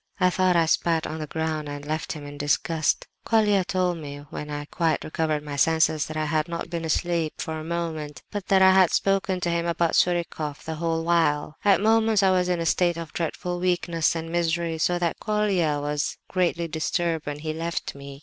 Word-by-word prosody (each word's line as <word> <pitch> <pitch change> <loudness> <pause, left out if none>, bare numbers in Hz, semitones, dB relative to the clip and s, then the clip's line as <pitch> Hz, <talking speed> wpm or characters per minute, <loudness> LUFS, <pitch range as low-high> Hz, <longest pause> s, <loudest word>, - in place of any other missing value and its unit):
"I 185 -1 +4
thought 185 0 +2
I 165 -1 +4
spat 165 0 +1
on 160 - -5
the 155 - -4
ground 155 -1 -2
and 145 0 -6
left 155 +1 -3
him 150 -3 -8
in 145 0 -8
disgust. 155 +2 +1 0.2
Colia 210 -4 +3
told 180 -2 0
me, 145 -1 -8
when 150 - -6
I 145 0 -4
quite 160 0 0
recovered 155 -1 -1
my 145 -1 -5
senses, 160 +1 +2
that 155 - -6
I 155 - 0
had 155 +1 0
not 170 0 -5
been 170 -1 -3
asleep 165 0 0
for 160 -2 -4
a - - -6
moment, 160 -4 -4
but 205 -2 -5
that 190 -1 +5
I 190 - +8
had 190 -2 +5
spoken 195 -1 +1
to 175 - 0
him 170 0 0
about 170 -1 +1
Surikoff 170 -4 0
the 160 - -4
whole 165 -1 0
while. 155 -3 +1
"At 200 -3 +4
moments 220 -1 +3
I 190 - +5
was 180 -1 +2
in 175 -1 +1
a 165 - -2
state 175 0 +2
of 165 -2 -7
dreadful 175 +1 -3
weakness 175 -2 +1
and 165 0 -4
misery, 170 -1 0
so 175 +2 +2
that 175 -1 -1
Colia 195 -8 +1
was 145 0 -2
greatly 170 -2 0
disturbed 160 0 -1
when 145 0 -3
he 155 +1 -4
left 165 +1 -3
me. 140 0 -10
165 Hz, 210 wpm, -25 LUFS, 155-175 Hz, 0.2 s, I